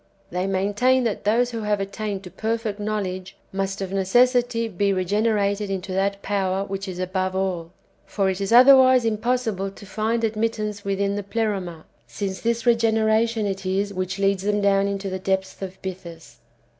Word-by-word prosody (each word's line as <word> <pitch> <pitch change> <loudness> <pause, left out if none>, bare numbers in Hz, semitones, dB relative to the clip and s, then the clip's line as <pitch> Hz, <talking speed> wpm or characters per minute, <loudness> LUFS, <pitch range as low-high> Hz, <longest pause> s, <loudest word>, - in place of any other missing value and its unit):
They 180 +2 -1
maintain 205 +7 +2
that 225 -4 -2
those 240 +4 +2
who 230 -1 -4
have 210 -1 0
attained 200 0 -4
to 180 - -10
perfect 220 +1 -2
knowledge 195 -3 -3 0.2
must 195 +1 -2
of 190 0 -4
necessity 240 +4 +2
be 200 -1 0
regenerated 200 +1 0
into 190 0 -4
that 200 +1 -1
power 195 -1 0
which 195 0 -5
is 185 -2 -6
above 185 +1 -2
all 185 -3 -2 0.4
For 195 -2 0
it 190 +1 -1
is 195 - -2
otherwise 255 0 +7
impossible 220 -3 0
to 195 +1 -13
find 220 +4 -1
admittance 215 -2 -1
within 200 0 -1
the - - -1
Pleroma, 195 -6 -3 0.2
since 190 +8 -4
this 235 0 -1
[regeneration] 225 -1 +2
it 195 -1 -3
is 200 +2 0
which 185 0 -3
leads 195 -1 +1
them 205 +1 0
down 200 0 +3
into 200 0 -3
the 190 0 -3
depths 190 0 -2
of 190 0 -6
Bythus. 175 -3 -8
200 Hz, 170 wpm, -23 LUFS, 190-220 Hz, 0.4 s, otherwise